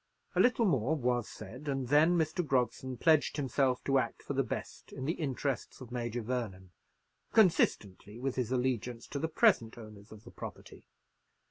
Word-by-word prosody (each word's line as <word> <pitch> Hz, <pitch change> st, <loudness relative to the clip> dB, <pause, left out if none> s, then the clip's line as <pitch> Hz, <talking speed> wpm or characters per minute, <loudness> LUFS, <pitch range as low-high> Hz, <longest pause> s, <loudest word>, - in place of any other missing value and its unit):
A -, -, 0 dB
little 245 Hz, -2 st, +4 dB
more 140 Hz, -, +2 dB
was 125 Hz, -4 st, 0 dB
said, 120 Hz, +8 st, -10 dB
and 135 Hz, -3 st, -2 dB
then 155 Hz, +5 st, +5 dB
Mr. 160 Hz, +2 st, 0 dB
Grogson 130 Hz, -2 st, -1 dB
pledged 155 Hz, +1 st, +3 dB
himself 135 Hz, -2 st, +1 dB
to 135 Hz, -1 st, +3 dB
act -, -, -4 dB
for -, -, -4 dB
the -, -, +2 dB
best -, -, -6 dB
in 130 Hz, -, -6 dB
the 160 Hz, -, +1 dB
interests 140 Hz, -4 st, -3 dB
of 125 Hz, -2 st, -11 dB
Major 120 Hz, -1 st, -3 dB
Vernon, 105 Hz, -7 st, -4 dB, 0.6 s
consistently 110 Hz, -, +2 dB
with 130 Hz, +1 st, -2 dB
his 125 Hz, -2 st, -2 dB
allegiance 125 Hz, -2 st, -1 dB
to 140 Hz, -, -3 dB
the 160 Hz, -, 0 dB
present 160 Hz, -, +3 dB
owners 105 Hz, -2 st, -12 dB
of 110 Hz, 0 st, -12 dB
the -, -, -12 dB
property. -, -, -10 dB
130 Hz, 170 wpm, -32 LUFS, 115-145 Hz, 0.6 s, then